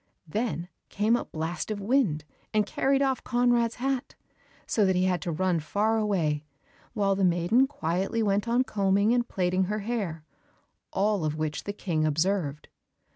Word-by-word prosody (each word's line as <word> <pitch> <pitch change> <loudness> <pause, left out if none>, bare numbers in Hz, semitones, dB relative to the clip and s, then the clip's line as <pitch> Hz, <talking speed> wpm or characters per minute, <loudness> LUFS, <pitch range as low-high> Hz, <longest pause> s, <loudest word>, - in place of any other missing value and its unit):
Then 205 -1 -2 0.2
came 215 +3 +2
a - - -2
blast 160 +5 -4
of 215 -1 -2
wind 200 - +1 0.3
and 210 -1 +4
carried 270 +6 +1
off 265 -1 0
Conrad's 240 -1 +2
hat, 265 0 -2 0.5
so 215 - +1
that 190 -1 +3
he 180 - +2
had 185 -1 +1
to 175 - -2
run 180 +1 +1
far 210 +8 +1
away, 165 -9 0 0.5
while 200 -3 +2
the 195 - 0
maiden 180 +9 +3
quietly 195 - -1
went 205 +1 +1
on 240 +2 +3
combing 200 0 +2
and 240 -1 +1
plaiting 185 0 +1
her 210 +3 -2
hair, 200 -8 -3 0.7
all 200 -2 +1
of 155 -1 -1
which 155 -1 -3
the 205 - -3
King 170 -6 -1
observed. 155 -1 0
200 Hz, 165 wpm, -27 LUFS, 170-230 Hz, 0.7 s, and